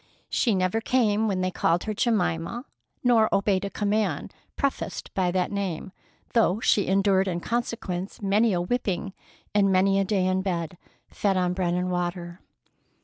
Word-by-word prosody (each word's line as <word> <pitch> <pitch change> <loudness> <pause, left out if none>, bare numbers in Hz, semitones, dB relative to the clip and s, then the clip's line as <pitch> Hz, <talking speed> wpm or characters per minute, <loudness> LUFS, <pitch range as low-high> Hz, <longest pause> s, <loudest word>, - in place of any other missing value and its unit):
She 230 -5 +2
never 185 +4 0
came 220 -3 +2
when 190 -3 0
they 185 0 0
called 170 -1 +1
her 215 - -2
Jemima, 210 - 0 0.4
nor 230 -3 +4
obeyed 195 -1 +2
a - - -3
command 205 -6 -1 0.2
prefaced 275 -1 -3
by 185 -2 +1
that 180 +1 0
name, 195 -2 -3 0.4
though 220 -4 +3
she 205 -3 +2
endured 195 0 +3
in 175 -2 -1
consequence 195 -3 -3
many 210 +3 +2
a 175 -2 +1
whipping 195 -2 -2 0.4
and 200 -2 +3
many 195 +1 +3
a - - +3
day 195 -1 0
in 185 0 +1
bed, 175 -3 -3 0.3
fed 195 -2 0
on 180 -1 +1
bread 180 -2 0
and 180 0 -1
water. 175 0 -3
195 Hz, 160 wpm, -26 LUFS, 180-210 Hz, 0.4 s, nor